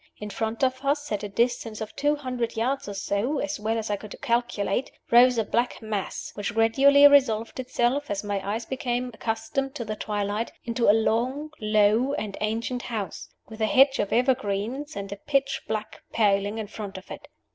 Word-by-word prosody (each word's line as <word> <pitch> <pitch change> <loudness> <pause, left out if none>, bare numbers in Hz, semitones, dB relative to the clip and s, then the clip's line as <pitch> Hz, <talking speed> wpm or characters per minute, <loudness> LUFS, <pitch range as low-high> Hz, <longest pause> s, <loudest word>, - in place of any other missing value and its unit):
In 210 0 -7
front 225 +3 -3
of 260 +1 +1
us, 290 +1 0
at 210 - -1
a 205 - -5
distance 225 0 0
of 220 -1 -6
two 290 +1 +2
hundred 250 -5 -3
yards 255 +1 -1
or 200 - -6
so 205 +9 -1
as 290 0 -2
well 220 +2 -1
as 220 -1 -3
I 205 - 0
could 210 +1 -9
calculate, 240 -2 0 0.2
rose 245 +1 +7
a 225 - +2
black 240 +4 -1
mass, 215 -3 -4
which 210 +3 -4
gradually 275 +6 +6
resolved 255 -6 +3
itself, 255 +2 0
as 200 0 -2
my 205 -1 -2
eyes 220 +3 -3
became 250 -2 -2
accustomed 225 +6 -3
to 235 - -4
the 215 0 -3
twilight, 210 +1 -2
into 230 -1 +1
a - - +10
long, 245 +7 0
low, 215 +5 +3
and 210 -7 -3
ancient 230 +3 -1
house, 220 -6 -5 0.2
with 220 0 -10
a 220 - +3
hedge 270 +3 +5
of 205 - -1
evergreens 250 +3 0
and 200 -1 -5
a 200 - -5
pitch 275 +4 0
black 215 0 -4
paling 205 -1 +2
in 220 - -3
front 205 -2 -7
of 190 - -12
it. - - -8
225 Hz, 190 wpm, -26 LUFS, 210-260 Hz, 0.2 s, a